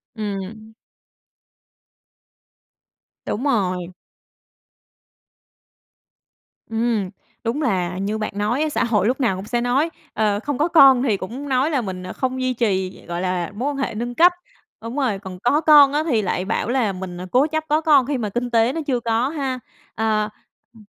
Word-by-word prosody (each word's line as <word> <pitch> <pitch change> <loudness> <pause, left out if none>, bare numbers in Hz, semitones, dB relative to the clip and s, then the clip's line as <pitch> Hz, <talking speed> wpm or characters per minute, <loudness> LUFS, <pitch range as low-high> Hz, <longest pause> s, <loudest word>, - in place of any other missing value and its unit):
Ừm. 215 +1 -6 2.5
Đúng 225 - -3
rồi. 185 -9 0 2.8
Ừm, 225 -4 0 0.3
đúng 240 +6 -1
là 185 - 0
như 205 +3 -2
bạn 215 - -3
nói 215 +7 0
á, 310 - +1
xã - - 0
hội 210 -4 +1
lúc 255 +3 0
nào 225 -7 +2
cũng 190 +2 -7
sẽ 240 +2 -1
nói, 260 +7 +1 0.2
ờ, 210 -2 +1
không 290 +4 -3
có 305 +5 +2
con 270 -6 +7
thì 215 -7 +1
cũng 255 +10 -7
nói 260 +3 +2
là 275 -5 +1
mình, 185 -3 -6
ờ, 185 - -6
không 260 0 -2
duy 255 0 0
trì, 190 -6 -1
gọi 170 0 -4
là, 180 -2 -2
mối 255 +7 -1
quan 285 - -4
hệ 270 -5 -2
nâng 240 +2 -4
cấp. 350 +5 +6 0.5
Đúng 230 +3 -6
rồi, 245 -9 0
còn 190 -2 -9
có 265 +9 +2
con 295 -3 +7
á 300 +1 +1
thì 255 -9 +1
lại 185 -1 -2
bảo 225 +2 -1
là 240 -5 +1
mình 185 -1 -7
à - - -5
cố 265 +4 +4
chấp 315 0 -2
có 305 +2 +2
con 290 -5 +5
khi 280 +1 -1
mà 220 -4 -2
kinh 240 +4 -2
tế 230 +2 +3
nó 325 - -3
chưa 255 -3 +1
có 235 +2 0
ha! 270 -4 -3 0.4
À, 215 -1 0 0.5
ừm. 220 -2 -17
235 Hz, 180 wpm, -21 LUFS, 200-270 Hz, 2.8 s, con